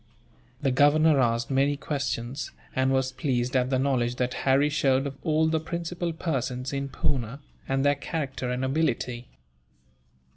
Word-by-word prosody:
The 135 - +3
Governor 145 +2 +5
asked 115 0 +1
many 140 +2 +2
questions, 140 -2 -3 0.3
and 130 0 +2
was 130 -1 +1
pleased 130 -3 -1
at 125 0 +2
the 130 - +2
knowledge 130 -3 +1
that 125 -1 -1 0.2
Harry 140 +2 +5
showed 135 -2 +2
of 140 -1 -4
all 155 0 +2
the 160 0 +1
principal 170 +1 -3
persons 135 -6 -3
in 140 0 -2
Poona, 130 -1 -2 0.3
and 135 +1 +1
their 145 - +5
character 140 -3 -4
and 125 +1 -1
ability. 125 -4 -1
135 Hz, 150 wpm, -27 LUFS, 125-145 Hz, 0.3 s, Governor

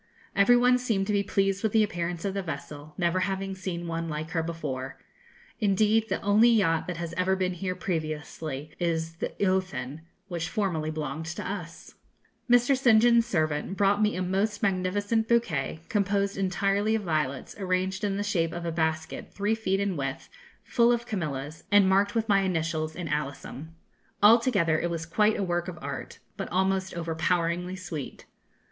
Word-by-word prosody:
Every 200 +5 +6
one 250 +1 +4
seemed 220 -6 0
to 210 - -1
be 200 - +3
pleased 195 0 0
with 220 - 0
the 220 -1 +5
appearance 175 -3 -3
of 195 - -1
the 195 - -1
vessel, 150 -2 -7
never 175 0 +1
having 195 0 -2
seen 185 -2 -5
one 165 0 -3
like 155 +1 -4
her 165 - 0
before. 145 -6 -4 0.6
Indeed, 215 +1 +2
the - - 0
only 210 +4 +5
yacht 185 -8 +2
that 180 -2 -4
has 170 -1 -5
ever 185 +2 +1
been 185 -1 -1
here 185 +1 -3
previously 155 -4 -4
is 165 -1 -1
the - - -2
'Eothen,' 185 -7 -1 0.3
which 170 -3 -3
formerly 170 -7 -1
belonged 155 0 -4
to 160 - -5
us. 175 -4 -7 0.6
Mr. 245 +3 +5
St. 240 -4 +5
John's 235 0 +4
servant 155 -2 -1
brought 205 +1 +3
me 210 0 +2
a 185 - -1
most 200 +4 -1
magnificent 205 +4 +1
bouquet, 210 -9 0
composed 200 -1 0
entirely 195 +3 +1
of 220 - -2
violets, 155 -6 -2
arranged 185 0 -1
in 200 -1 0
the 205 - -1
shape 170 -6 0
of 170 0 -5
a 170 - -1
basket, 160 -1 -2
three 205 +2 0
feet 195 -4 0
in 200 -2 0
width, 135 -2 -4 0.3
full 235 -1 +3
of 235 0 0
camellias, 155 - -4
and 205 -2 +6
marked 200 +2 +3
with 225 -1 +1
my 200 -2 +4
initials 165 -4 -1
in 175 -2 -5
alyssum. 150 0 -4 0.6
Altogether 210 -8 +5
it 175 - -1
was 165 -1 -3
quite 210 +5 +2
a - - -1
work 175 -1 -1
of 180 -2 -6
art, - - -6 0.2
but - - -4
almost 190 0 0
overpoweringly 170 +2 -1
sweet. 175 -7 -7
185 Hz, 175 wpm, -27 LUFS, 165-205 Hz, 0.6 s, Every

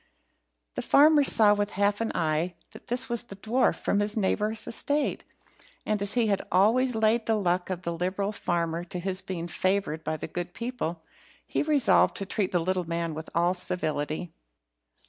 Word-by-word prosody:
The - - -3
farmer 295 +1 +5
saw 215 -6 +6
with 205 0 -2
half 205 +1 +1
an 230 - -1
eye 165 +2 0 0.2
that - - -14
this 245 +1 -2
was 235 -2 -1
the 200 - -10
dwarf 225 +6 +1
from 205 - 0
his 205 +1 +2
neighbour's 210 +2 0
estate, 290 +5 0 0.6
and 215 -1 -1
as 200 0 +2
he 240 -2 +3
had 200 -2 +1
always 230 +7 +3
laid 220 +1 +1
the 225 - +3
luck 180 -3 0
of 180 -1 -4
the 170 - -2
liberal 185 +4 -2
farmer 170 -4 -2
to 180 - -6
his 185 +1 -2
being 175 -3 -5
favoured 185 -2 -1
by 155 - -2
the - - -5
good 175 0 -6
people, 230 -9 -4 0.4
he - - -1
resolved 295 -3 +3
to 195 - -2
treat 195 0 -2
the 180 - +2
little 180 0 -1
man 170 -1 -2
with 160 +1 -7
all 175 +1 +2
civility. 155 -2 -3
195 Hz, 185 wpm, -27 LUFS, 175-220 Hz, 0.6 s, saw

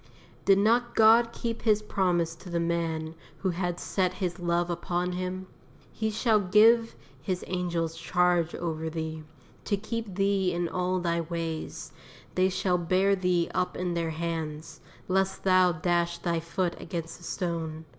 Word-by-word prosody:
Did 195 -1 +6
not 235 +4 +2
God 230 +1 +6
keep 230 -1 -4
His 215 -2 +2
promise 175 -5 +1
to 180 - -11
the 170 -1 -1
man 165 -1 -1 0.2
who 190 - -1
had 175 0 -2
"set 185 -2 0
his 180 -2 -3
love 175 0 0
upon 175 +1 -1
Him"? 185 +1 -4 0.5
"_He 220 -1 -1
shall 220 0 +3
give 220 +4 +4 0.3
His 185 -3 -2
angels 170 -3 -2
charge 175 -2 +1
over 160 -2 -3
thee, 160 -1 -4 0.4
to 200 - +1
keep 220 -1 -5
thee 195 -1 +1
in 175 0 -1
all 180 +2 -1
thy 170 -1 0
ways: 165 -1 -5 0.4
they 185 +1 +3
shall 180 -1 0
bear 185 +3 +2
thee 180 -2 +1
up 180 0 -1
in 180 -1 -1
their 170 -1 -1
hands, 160 -1 -4 0.3
lest 190 +1 0
thou 185 -1 +5
dash 170 +1 0
thy 170 -2 -1
foot 170 +2 -1
against 170 -2 -5
a - - -16
stone. 165 -4 -3
180 Hz, 155 wpm, -28 LUFS, 170-190 Hz, 0.5 s, Did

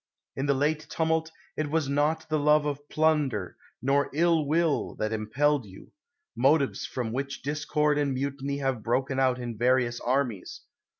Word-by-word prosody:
In 135 +2 -2
the 140 - +3
late 150 +3 0
tumult, 160 0 0 0.2
it 155 -1 -2
was 155 -1 0
not 150 +3 0
the 155 -1 0
love 150 +1 +4
of 145 0 -4
plunder, 150 - +1 0.3
nor 140 +2 +2
ill 165 -2 +3
will, 160 0 +1
that 110 +1 -2
impelled 130 +4 +1
you 95 0 -14 0.2
— 345 0 -54
motives 140 +2 +2
from 120 -3 -3
which 140 +2 -4
discord 150 +1 0
and 145 -1 +1
mutiny 140 +1 -3
have 135 -4 -1
broken 130 +4 0
out 130 -1 +3
in 120 -3 -6
various 120 -1 +2
armies. 125 -6 -2
140 Hz, 165 wpm, -27 LUFS, 130-150 Hz, 0.3 s, love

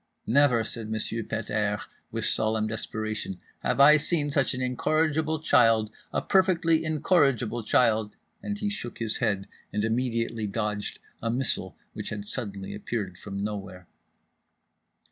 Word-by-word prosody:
"Never," 125 -2 +4
said 110 0 -6
Monsieur 110 +1 -2
Pet 115 0 -4
airs 105 -1 0 0.3
with - - -2
solemn 110 0 +1
desperation, 110 -3 -4 0.2
"have - - -1
I 150 +2 +9
seen 150 -1 0
such 140 -3 +2
an - - -4
incorrigible 155 +4 +1
child, 115 -6 +4 0.2
a - - -1
perfectly 170 -4 +3
incorrigible 140 - +2
child," 110 -1 +2 0.3
and 205 0 -3
he 210 - -2
shook 120 - -6
his 115 -2 -2
head 100 -2 0 0.2
and 105 - 0
immediately 115 -1 -1
dodged 105 0 -2 0.2
a 115 - -1
missile 125 +2 -1 0.2
which - - -5
had 105 -1 -5
suddenly 100 -4 -4
appeared 100 -3 -4
from 100 -1 -5
nowhere. 95 -3 -5
115 Hz, 140 wpm, -27 LUFS, 105-140 Hz, 0.3 s, I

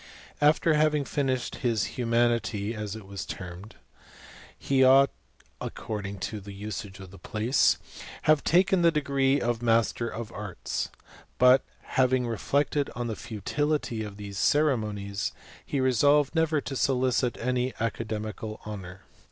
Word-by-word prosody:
After 155 +2 +4
having 150 -1 +2
finished 130 -4 -1
his 115 -4 0
humaidty 115 -3 +1
(as 105 -2 -5
it 110 -3 -9
was 100 0 -6
termed), 95 +4 -8 0.8
he 135 -1 +2
ought, 135 +1 +6 0.5
according 100 -2 -5
to 105 - -3
the 100 0 -10
usage 100 -1 -6
of 95 -1 -10
the 95 - -13
place, 110 +6 +2
to - - -13 0.2
have 155 -2 +4
taken 180 +1 +3
his 170 -1 +5
degree 140 -2 +2
of 120 -1 -1
master 115 0 +2
of 115 0 -6
arts; 105 -5 -4 0.5
but, 125 +1 +6 0.2
having 130 -1 +2
reflected 140 +5 0
on 120 - -3
the 115 -2 -3
futility 120 +4 -2
of 100 -2 -8
these 100 -2 -6
ceremonies, 105 -9 +1 0.3
he 140 - -2
resolved 140 +3 +3
never 160 -2 +2
to 135 - -5
solicit 130 -2 +1
any 125 +1 0
aca 115 0 -1
demical 110 0 -5
honour. 95 -3 -7
120 Hz, 140 wpm, -27 LUFS, 105-140 Hz, 0.8 s, ought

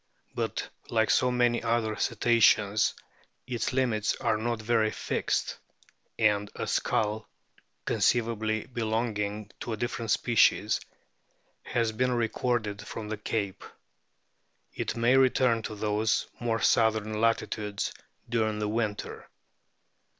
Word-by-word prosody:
But - - -2 0.2
like 110 -1 +2
so 125 - +3
many 120 -1 +2
other 115 -2 0
Cetaceans 110 -2 +3 0.5
its 125 -3 -2
limits 120 -5 +1
are - - 0
not 115 +1 -2
very 110 -1 +2
fixed, - - -2 0.6
and 105 -2 +2
a - - -3
skull 105 +1 0 0.6
(conceivably 110 -2 +1
belonging 110 -3 -2
to 120 - -4
a - - -4
different 120 0 -3
species) 115 +1 +3 0.8
has 115 -2 0
been 125 +3 0
recorded 115 -2 -1
from 105 0 -7
the 110 - -3
Cape. 100 -2 -3 1.1
It - - -3
may 120 +3 +4
return 130 -3 +3
to 110 - -6
those 105 0 0
more 115 -2 -1
southern 110 -1 +2
latitudes 105 -3 0 0.3
during 110 -2 0
the 105 0 -1
winter. 105 -2 -3
110 Hz, 115 wpm, -28 LUFS, 105-120 Hz, 1.1 s, may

